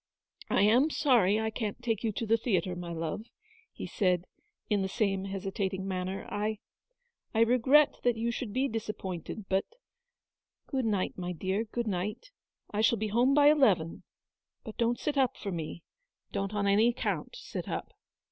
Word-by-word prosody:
" -, -, -19 dB
I -, -, +3 dB
am 245 Hz, +9 st, +5 dB
sorry 225 Hz, -10 st, +3 dB
I 220 Hz, 0 st, -1 dB
can't 215 Hz, -1 st, -3 dB
take 225 Hz, -2 st, -1 dB
you 225 Hz, -, +1 dB
to 230 Hz, -, -3 dB
the 225 Hz, +1 st, +4 dB
theatre, 190 Hz, -6 st, 0 dB
my 175 Hz, -1 st, -6 dB
love," 165 Hz, +7 st, -4 dB, 0.4 s
he -, -, -7 dB
said, 180 Hz, -3 st, +1 dB, 0.4 s
in 205 Hz, -2 st, +1 dB
the 190 Hz, -, 0 dB
same 195 Hz, -1 st, 0 dB
hesitating 195 Hz, 0 st, -3 dB
manner. 185 Hz, 0 st, -3 dB
" -, -, -10 dB
I 215 Hz, 0 st, -1 dB, 0.4 s
— 485 Hz, -1 st, -49 dB
I 225 Hz, -, +4 dB
regret 255 Hz, +5 st, +5 dB
that 245 Hz, -2 st, +2 dB
you 230 Hz, +1 st, 0 dB
should 235 Hz, -2 st, -4 dB
be 260 Hz, +5 st, +1 dB
disappointed, 210 Hz, -, -5 dB
but 190 Hz, 0 st, +1 dB, 0.5 s
— -, -, -63 dB
good 265 Hz, -4 st, 0 dB
night, 200 Hz, -4 st, -1 dB
my 180 Hz, 0 st, -3 dB
dear, 190 Hz, +6 st, -1 dB
good 235 Hz, +2 st, -3 dB
night. 210 Hz, -, -3 dB, 0.4 s
I 210 Hz, -, 0 dB
shall 230 Hz, +1 st, +4 dB
be 215 Hz, +1 st, -2 dB
home 245 Hz, +6 st, +3 dB
by 290 Hz, 0 st, +7 dB
eleven; 195 Hz, -, +3 dB, 0.6 s
but 220 Hz, -, -8 dB
don't 235 Hz, 0 st, +1 dB
sit 290 Hz, +2 st, -1 dB
up 260 Hz, -3 st, +2 dB
for 200 Hz, -, -4 dB
me; 165 Hz, 0 st, -5 dB, 0.5 s
don't 195 Hz, +1 st, -2 dB
on 205 Hz, -1 st, 0 dB
any 205 Hz, +3 st, +5 dB
account 240 Hz, -, -2 dB
sit -, -, -6 dB
up." -, -, -4 dB
215 Hz, 185 wpm, -30 LUFS, 190-235 Hz, 0.6 s, by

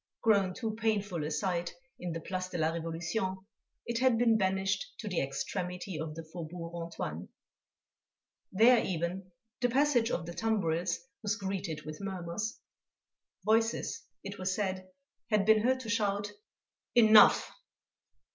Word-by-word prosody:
Grown 200 Hz, -5 st, +3 dB
too 225 Hz, -3 st, -3 dB
painful 205 Hz, -7 st, 0 dB
a 150 Hz, -, -2 dB
sight 170 Hz, +2 st, -1 dB, 0.2 s
in 180 Hz, -1 st, -4 dB
the 165 Hz, -, -3 dB
Place 185 Hz, +2 st, -4 dB
de 175 Hz, -, -4 dB
la 160 Hz, 0 st, +2 dB
Révolution, 175 Hz, +4 st, -3 dB, 0.4 s
it 235 Hz, 0 st, -1 dB
had 255 Hz, -3 st, +4 dB
been 230 Hz, -1 st, +4 dB
banished 195 Hz, -1 st, +1 dB
to 220 Hz, -, -7 dB
the 180 Hz, -4 st, 0 dB
extremity 180 Hz, +5 st, -3 dB
of 155 Hz, -1 st, -4 dB
the 165 Hz, -, -6 dB
Faubourg 165 Hz, +1 st, -7 dB
Antoine. 165 Hz, -, -5 dB, 1.2 s
There 230 Hz, +5 st, +6 dB
even, 185 Hz, +2 st, -3 dB, 0.3 s
the 245 Hz, -, +2 dB
passage 255 Hz, -2 st, +3 dB
of 170 Hz, -, -2 dB
the 170 Hz, -, -6 dB
tumbrils 180 Hz, -6 st, 0 dB, 0.2 s
was 210 Hz, -1 st, 0 dB
greeted 190 Hz, -6 st, -4 dB
with 155 Hz, +2 st, -7 dB
murmurs. 190 Hz, +2 st, -4 dB, 0.9 s
Voices, 225 Hz, +1 st, +1 dB, 0.2 s
it 200 Hz, 0 st, -7 dB
was 185 Hz, 0 st, -1 dB
said, 185 Hz, -2 st, -2 dB, 0.4 s
had 210 Hz, -3 st, +3 dB
been 220 Hz, 0 st, +6 dB
heard 260 Hz, +3 st, +2 dB
to 230 Hz, -, -7 dB
shout: 205 Hz, -2 st, 0 dB, 0.6 s
"Enough!" 220 Hz, -3 st, +7 dB
190 Hz, 140 wpm, -31 LUFS, 170-220 Hz, 1.2 s, Enough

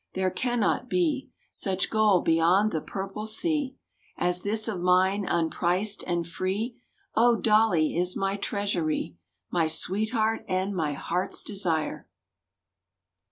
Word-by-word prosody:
—there 185 Hz, 0 st, 0 dB
cannot 245 Hz, +1 st, 0 dB
be 310 Hz, -7 st, 0 dB, 0.2 s
Such 190 Hz, -2 st, -1 dB
gold 215 Hz, -4 st, +3 dB
beyond 170 Hz, +6 st, +3 dB
the 160 Hz, -, -2 dB
Purple 195 Hz, +5 st, -5 dB
Sea 280 Hz, +3 st, 0 dB, 0.4 s
As 180 Hz, 0 st, +1 dB
this 215 Hz, +3 st, -1 dB
of 205 Hz, -5 st, -3 dB
mine—unpriced 180 Hz, +1 st, +1 dB
and 175 Hz, -1 st, 0 dB
free! 200 Hz, +8 st, -3 dB, 0.3 s
Oh, 235 Hz, +1 st, +4 dB
Dolly 210 Hz, -9 st, +3 dB
is 180 Hz, +1 st, 0 dB
my 195 Hz, 0 st, 0 dB
treasury, 185 Hz, -, -2 dB, 0.3 s
My 165 Hz, -2 st, +2 dB
sweetheart 220 Hz, +7 st, 0 dB
and 190 Hz, +2 st, -1 dB
my 155 Hz, -4 st, -1 dB
heart's 180 Hz, +6 st, -2 dB
desire! 170 Hz, -7 st, -2 dB
195 Hz, 115 wpm, -27 LUFS, 175-220 Hz, 0.4 s, Oh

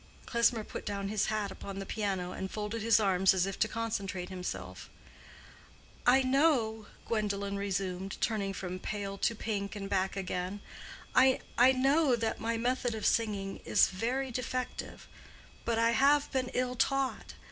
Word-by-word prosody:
Klesmer 235 Hz, -1 st, +2 dB
put -, -, -7 dB
down 200 Hz, -1 st, -3 dB
his 210 Hz, -1 st, +1 dB
hat 215 Hz, -2 st, -1 dB
upon 195 Hz, 0 st, -7 dB
the 195 Hz, -, -4 dB
piano, 195 Hz, -5 st, -2 dB
and 190 Hz, -, -4 dB
folded 215 Hz, +2 st, -4 dB
his 225 Hz, 0 st, +4 dB
arms 190 Hz, -2 st, +4 dB
as 185 Hz, -1 st, +2 dB
if 195 Hz, -, -5 dB
to 215 Hz, -, +3 dB
concentrate 200 Hz, -5 st, -3 dB
himself. 95 Hz, -, -6 dB, 1.2 s
"I 260 Hz, +2 st, +6 dB
know," 255 Hz, -6 st, +2 dB, 0.2 s
Gwendolen 200 Hz, -3 st, -1 dB
resumed, 195 Hz, -1 st, -3 dB
turning 205 Hz, -3 st, 0 dB
from 185 Hz, -1 st, -5 dB
pale 200 Hz, 0 st, -4 dB
to 230 Hz, -, +1 dB
pink 205 Hz, -2 st, -3 dB
and 200 Hz, -1 st, -5 dB
back 195 Hz, -1 st, 0 dB
again—"I 200 Hz, +7 st, -1 dB, 0.3 s
know 270 Hz, +1 st, +4 dB
that 225 Hz, -1 st, -2 dB
my 230 Hz, 0 st, 0 dB
method 245 Hz, 0 st, 0 dB
of 215 Hz, -, -4 dB
singing 205 Hz, -4 st, +1 dB
is 205 Hz, -, +4 dB
very 250 Hz, +7 st, -2 dB
defective; 250 Hz, +1 st, -4 dB, 0.6 s
but 230 Hz, -1 st, +1 dB
I 230 Hz, 0 st, +4 dB
have 280 Hz, +5 st, +4 dB
been 255 Hz, -2 st, 0 dB
ill 250 Hz, 0 st, 0 dB
taught. 275 Hz, +1 st, 0 dB
215 Hz, 150 wpm, -31 LUFS, 195-240 Hz, 1.2 s, I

